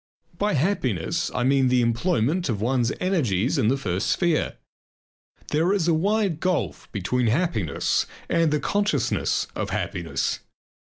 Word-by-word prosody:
By 205 0 +1
happiness 130 - 0
I 125 - +1
mean 135 0 +3
the 125 -1 +3
employment 145 +6 +1
of 110 -4 -1
one's 120 +2 +1
energies 140 - +1
in 115 - +2
the 135 +4 +2
first 95 -6 -2
sphere. 170 -4 +1 0.9
There 165 +6 +2
is 185 -5 +1
a 170 - +4
wide 195 0 +1
gulf 150 - -2
between 115 +6 0
happiness 115 - 0 0.2
and 165 -1 +2
the 150 0 +1
consciousness 205 +7 0
of - - -3
happiness. - - -2
140 Hz, 140 wpm, -24 LUFS, 115-175 Hz, 0.9 s, a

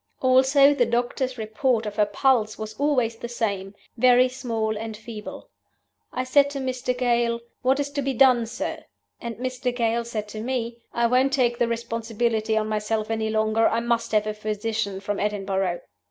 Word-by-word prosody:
Also, 265 +2 +5
the 245 -4 +2
doctor's 245 +2 -1
report 225 +1 0
of 210 -1 -5
her 210 -1 +3
pulse 215 0 +1
was 215 0 -6
always 255 -6 +1
the 235 - -6
same 200 -5 -3 0.2
'very 250 +1 +5
small 225 -4 -2
and 220 0 -5
feeble.' 220 -1 -9 0.6
I 255 - -2
said 280 +2 +4
to 280 -1 -5
Mr. 255 -1 -2
Gale, 235 -1 +1 0.2
'What 265 +2 +2
is 285 0 -2
to 285 0 -2
be 270 -1 -2
done, 245 -2 +5
sir?' 230 - -5 0.4
And 235 -2 -5
Mr. 255 0 -2
Gale 235 -1 +1
said 215 -3 -4
to 215 0 -6
me, 235 -1 -3
'I 235 - +1
won't 255 +3 +3
take 240 -3 +2
the 240 - +3
responsibility 230 -1 -1
on 215 - +1
myself 215 +1 -1
any 220 -1 -1
longer; 220 +1 +2
I 230 - +1
must 235 0 -1
have 210 -1 +3
a 215 - -2
physician 210 -1 -3
from 205 +1 -3
Edinburgh. 195 -4 -1
230 Hz, 180 wpm, -24 LUFS, 215-255 Hz, 0.6 s, Also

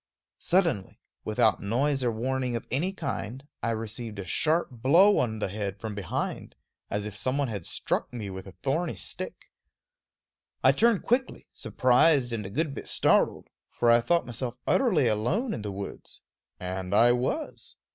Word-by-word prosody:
Suddenly, 165 - +1 0.2
without - - +2
noise 135 +6 0
or 120 - +2
warning 125 +2 -1
of 115 - -4
any 160 +10 +1
kind, 135 - -5
I 115 - 0
received 110 0 -4
a 100 - -5
sharp 160 - +1
blow 160 - +5
on 110 -3 0
the 105 - -2
head 100 0 -4
from 110 -1 -5
behind, 100 -4 -4 0.3
as 105 0 -2
if 105 -1 -6
some 130 +6 -1
one 140 -3 0
had 100 -6 -5
struck - - -2
me 110 -5 -5
with 95 +1 -8
a 95 - -10
thorny 160 +6 0
stick. - - -6 1.1
I - - +7
turned 230 -3 +3
quickly, 255 +2 0
surprised 130 0 +3
and 105 -4 -3
a - - -8
good 145 +6 -1
bit - - -7
startled; - - +2 0.3
for 120 -1 +4
I 120 0 +6
thought 170 +8 +2
myself 120 0 -5
utterly 190 - +3
alone 120 - 0
in - - -4
the 105 -1 -4
woods 100 0 -8 0.4
and 90 +1 -3
I 120 +3 +6
was. 125 - -2
120 Hz, 165 wpm, -27 LUFS, 105-150 Hz, 1.1 s, I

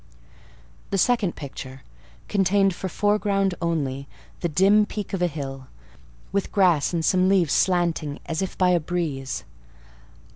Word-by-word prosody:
The 195 - 0
second 210 -3 +2
picture 135 -2 -8 0.4
contained 195 0 +2
for 190 +2 -5
foreground 200 -1 +1
only 140 -5 -2 0.3
the 175 - -1
dim 195 +6 +4
peak 210 -3 -6
of 190 - -2
a 180 - +3
hill, 135 -4 -6 0.6
with 200 0 -1
grass 180 -7 +3
and 165 -2 -1
some 185 0 +3
leaves 180 -7 +3
slanting 170 -5 +1
as 160 +2 -2
if 190 - -4
by 180 -1 +3
a 175 - +3
breeze. 155 -5 -3
180 Hz, 140 wpm, -24 LUFS, 150-195 Hz, 0.6 s, dim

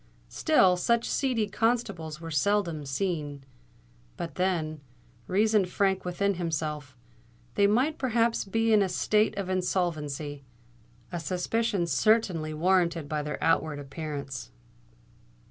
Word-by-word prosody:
Still, 190 - +4
such 235 +5 +1
seedy 250 -6 0
constables 200 -8 -1
were 165 -1 -7
seldom 165 -2 0
seen: 145 -2 -2 0.7
but 165 - -5
then, 165 -5 -1 0.5
reasoned 210 0 +2
Frank 190 0 +1
within 200 +3 0
himself, 150 -5 -3 0.6
they 200 - +4
might 255 +9 +1
perhaps 235 -2 +1
be 225 +3 +1
in 210 - +6
a 195 - +1
state 210 +4 +1
of 200 -2 -2
insolvency—a 145 -8 -4
suspicion 190 +3 0
certainly 170 -1 +2
warranted 170 -1 +1
by 150 0 -2
their 150 0 -4
outward 155 -2 +2
appearance. 140 -2 -6
175 Hz, 110 wpm, -28 LUFS, 150-205 Hz, 0.7 s, in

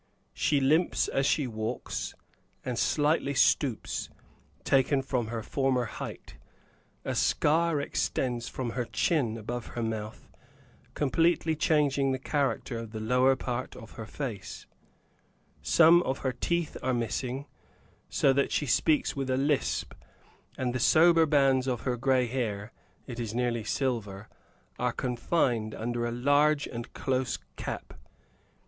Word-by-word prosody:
She 145 - +2
limps 155 +6 +2
as 135 0 +1
she 145 -1 +2
walks, 110 -2 -4 0.5
and 125 -2 -2
slightly 145 -1 +1
stoops, 130 -3 +1 0.5
taken 135 0 +2
from 125 -4 -1
her 115 -1 -4
former 130 -1 0
height. - - -8 0.7
A - - -1
scar 160 +1 +2
extends 125 -3 -2
from 125 -3 -4
her 120 +1 -2
chin 120 -6 0
above 120 +2 -5
her 120 - -1
mouth, 110 -1 -5 0.7
completely 160 +2 +2
changing 145 -3 +2
the - - -1
character 135 -3 -1
of 115 -1 -8
the 110 - -4
lower 125 +4 +3
part 125 -1 -4
of 110 - -11
her 110 -2 -8
face; 110 -4 -6 1.0
some 160 - +6
of 135 -5 -2
her 130 - +1
teeth 170 +6 -1
are 130 -1 0
missing, 125 +3 -2 0.6
so 135 - +3
that 140 +1 +1
she 150 - 0
speaks 150 +3 +2
with 135 -1 -3
a 130 - +1
lisp, 140 +1 0 0.6
and 125 -2 -1
the 130 - -1
sober 165 +4 +5
bands 135 -3 +3
of 125 -3 -1
her 125 -2 -1
gray 130 +1 +2
hair 115 -4 -3 0.3
it 120 -2 -7
is 115 -2 -4
nearly 120 -2 0
silver 105 -5 -2 0.5
are - - 0
confined 120 -3 0
under 120 +1 -2
a - - -3
large 145 +4 +3
and 120 0 -7
close 130 -2 -1 0.2
cap. - - -6
130 Hz, 140 wpm, -29 LUFS, 120-145 Hz, 1.0 s, some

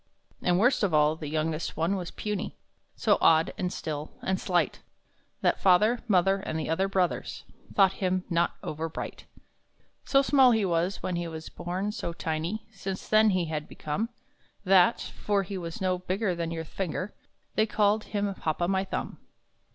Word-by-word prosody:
And, 175 -1 +2
worst 245 +6 +3
of 190 -7 +2
all, 150 +1 +4
the 160 -2 -7
youngest 155 +1 -2
one 170 +5 +1
was 180 -3 -4
puny, 210 -3 -4 0.4
So - - +2
odd, 160 0 +4
and 180 -1 -2
still, 150 -3 -4
and 190 0 0
slight, 175 -4 0 0.6
That - - +2
father, 210 +6 +5
mother, 195 -1 +4
and 160 -5 -4
the 155 - -2
other 190 +4 +1
brothers, 190 -3 -1 0.3
Thought 195 -2 +5
him 185 -1 +1
not 170 -1 +1
over 160 +2 -3
bright. - - -7 0.8
So 275 0 +3
small 265 -3 +6
he 220 -3 +2
was 175 +2 0
when 180 -2 -1
he 175 0 -2
was 160 -1 -7
born, 180 +4 -3
so 170 -5 -4
tiny 165 +5 -3
Since 195 -2 -6
then 215 0 +6
he 185 -3 +1
had 155 -2 -4
become, 180 +10 -3 0.5
That 190 +2 +5
for 200 -1 -1
he 195 +1 -6
was 170 -3 -5
no 185 -1 0
bigger 185 +2 -1
than 170 -1 -3
your 165 -1 -4
finger 185 +3 -4 0.4
They 215 +1 +2
called 210 0 +2
him 205 -1 -1
Hop 155 -4 -2
o' 175 - +1
my 190 0 +1
Thumb. 195 - -4
185 Hz, 175 wpm, -28 LUFS, 165-200 Hz, 0.8 s, small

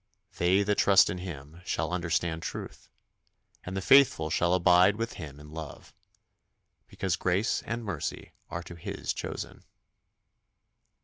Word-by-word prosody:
They 90 +4 +3
that 105 0 0
trust 100 -1 +6
in 90 - -5
Him 80 -2 -8
shall 85 -2 -2
understand 85 -1 -1
truth, - - -7 0.7
And 95 +1 -5
the - - -1
faithful 95 - +5
shall 85 +2 +2
abide 90 +2 +5
with 115 +2 -3
Him 75 -5 -9
in 75 0 -13
love; 80 -1 -9 0.9
Because 95 -2 -2
grace 95 +5 0
and 115 0 -3
mercy 95 -8 -4 0.2
are 85 - -5
to 85 - -10
His 85 - -4
chosen. - - -6
90 Hz, 135 wpm, -29 LUFS, 80-95 Hz, 0.9 s, trust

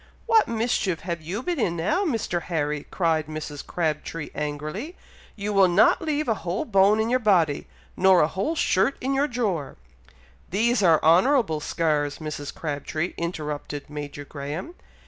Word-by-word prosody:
"What 445 -1 +4
mischief 220 -7 0
have 170 -2 -4
you 185 +10 -4
been 350 -1 -2
in 175 -7 +1
now, 190 - 0
Mr. 225 - -1
Harry?" 150 -4 -2
cried 160 -4 0
Mrs. 155 -2 -6
Crabtree, 160 -1 -3
angrily; 155 - -4 0.4
"you 205 0 -3
will 195 -1 +6
not 180 +4 +4
leave 305 -2 -1
a 225 - +3
whole 175 +4 -2
bone 200 0 +4
in 220 - +1
your 255 - +3
body, 175 - +2 0.3
nor 190 -1 +5
a 150 - +4
whole 195 - -2
shirt 230 - +2
in 270 +2 -1
your 275 +2 +2
drawer!" 205 - -2 0.7
"These 230 +5 +2
are 165 -4 +4
honourable 180 - +4
scars, 150 -2 0
Mrs. 150 -2 -5
Crabtree," 155 +2 -3
interrupted 150 -4 -5
Major 145 -1 -6
Graham. 145 - -6
175 Hz, 155 wpm, -25 LUFS, 150-220 Hz, 0.7 s, will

